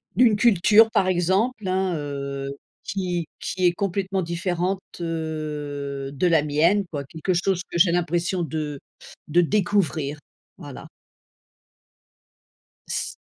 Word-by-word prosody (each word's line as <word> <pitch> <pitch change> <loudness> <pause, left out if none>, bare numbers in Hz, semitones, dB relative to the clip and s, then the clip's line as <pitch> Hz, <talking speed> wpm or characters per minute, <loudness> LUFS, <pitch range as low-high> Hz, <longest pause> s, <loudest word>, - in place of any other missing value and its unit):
d'une 235 -4 +5
culture 215 +1 +5
par 190 - +2
exemple, 190 +5 +1
hein, 185 -1 0
heu, 140 -1 -4 0.3
qui 180 -3 -2
qui 185 0 -2
est 175 - +5
complètement 195 +1 -1
différente, 175 +2 -1 0.2
heu, 150 -4 -4
de 145 +6 +1
la 165 -3 +4
mienne, 165 +7 +2
quoi, 145 -3 -3
quelque 160 +6 -3
chose 180 +1 +1
que - - -3
j'ai 170 0 +5
l'impression 175 +1 0
de 150 -2 -4 0.5
de 170 +4 +4
découvrir, 170 -6 0 0.4
voilà. - - -9 2.0
C - - -2
175 Hz, 120 wpm, -24 LUFS, 150-190 Hz, 2.0 s, d'une